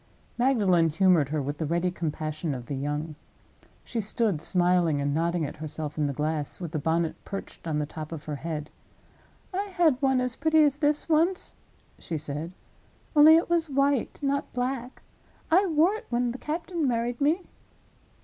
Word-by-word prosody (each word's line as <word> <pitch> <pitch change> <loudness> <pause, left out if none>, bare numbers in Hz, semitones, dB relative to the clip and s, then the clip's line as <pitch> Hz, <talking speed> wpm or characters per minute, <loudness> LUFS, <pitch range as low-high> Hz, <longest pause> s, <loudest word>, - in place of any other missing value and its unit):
Magdalen 205 -10 +3
humored 165 -3 +3
her, 150 -1 -1
with 145 +2 -4
the 160 - -1
ready 170 +3 0
compassion 155 -2 -3
of 125 -2 -7
the 140 - -5
young. 150 +3 -3 0.7
She 230 - -3
stood 210 -5 0
smiling 175 -3 +3
and 140 0 0
nodding 170 +1 0
at 145 - -7
herself 155 -1 -5
in 150 -2 0
the - - -1
glass, 150 +1 -2
with 170 -4 -5
the 155 - -2
bonnet 160 +2 -1
perched 195 -3 -7
on 155 -2 -1
the 150 - 0
top 155 +1 -8
of 160 -3 -6
her 150 -1 -5
head. 155 -1 -5 0.8
"I 390 +2 -1
had 340 -9 +2
one 265 -2 +3
as 250 -1 -1
pretty 315 +2 +4
as 290 -1 +2
this, 295 -1 +1
once," 330 +4 +1 0.4
she 165 - -4
said—"only 170 - +1
it 330 - +3
was 335 -2 +1
white, 275 -2 +1
not 280 0 -1
black. 250 0 -3 0.5
I 380 +4 +5
wore 330 +3 +3
it 435 - -7
when 240 0 0
the 255 - -7
captain 330 0 -2
married 240 +1 -1
me." 320 +6 +2
185 Hz, 175 wpm, -27 LUFS, -, 0.8 s, I